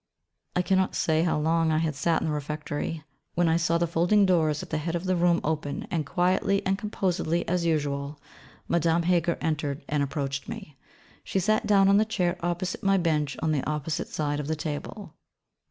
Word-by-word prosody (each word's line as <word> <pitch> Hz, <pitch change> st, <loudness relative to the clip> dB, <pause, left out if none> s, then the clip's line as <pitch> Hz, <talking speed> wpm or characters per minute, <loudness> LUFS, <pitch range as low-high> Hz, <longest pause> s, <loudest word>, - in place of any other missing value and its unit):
I 180 Hz, -, +2 dB
cannot 190 Hz, +1 st, +1 dB
say 160 Hz, -1 st, +2 dB
how 170 Hz, -2 st, +1 dB
long 160 Hz, +1 st, +2 dB
I 155 Hz, -, +2 dB
had 160 Hz, -1 st, 0 dB
sat 160 Hz, +4 st, 0 dB
in -, -, -1 dB
the -, -, -1 dB
Refectory, 150 Hz, +1 st, -4 dB, 0.3 s
when 175 Hz, 0 st, +3 dB
I 165 Hz, -, +3 dB
saw 170 Hz, 0 st, +2 dB
the 170 Hz, -, +1 dB
folding 175 Hz, +5 st, +3 dB
doors 160 Hz, -5 st, +2 dB
at -, -, -11 dB
the 155 Hz, -, 0 dB
head 165 Hz, +2 st, -3 dB
of 170 Hz, -, -2 dB
the 185 Hz, 0 st, +1 dB
room 175 Hz, 0 st, +3 dB
open, 150 Hz, -2 st, -2 dB
and 155 Hz, -4 st, -1 dB
quietly 185 Hz, +4 st, +1 dB
and 190 Hz, -, +2 dB
composedly 185 Hz, -5 st, -1 dB
as 175 Hz, -1 st, 0 dB
usual, 145 Hz, -2 st, -1 dB, 0.5 s
Madame 170 Hz, 0 st, +2 dB
Heger 175 Hz, -1 st, +2 dB
entered 145 Hz, -3 st, -2 dB
and 150 Hz, -1 st, 0 dB
approached 140 Hz, +4 st, -3 dB
me. 215 Hz, -11 st, -8 dB, 0.5 s
She -, -, -3 dB
sat 215 Hz, +3 st, +1 dB
down 200 Hz, -2 st, +5 dB
on 200 Hz, 0 st, +5 dB
the 215 Hz, -, +5 dB
chair 180 Hz, -5 st, 0 dB
opposite 175 Hz, +1 st, -2 dB
my 195 Hz, 0 st, +3 dB
bench 155 Hz, -5 st, 0 dB
on 160 Hz, -, +2 dB
the 145 Hz, -4 st, 0 dB
opposite 155 Hz, +2 st, -2 dB
side 145 Hz, -1 st, -2 dB
of 145 Hz, -, -4 dB
the 160 Hz, -, 0 dB
table. 155 Hz, +4 st, -6 dB
165 Hz, 200 wpm, -27 LUFS, 150-180 Hz, 0.5 s, down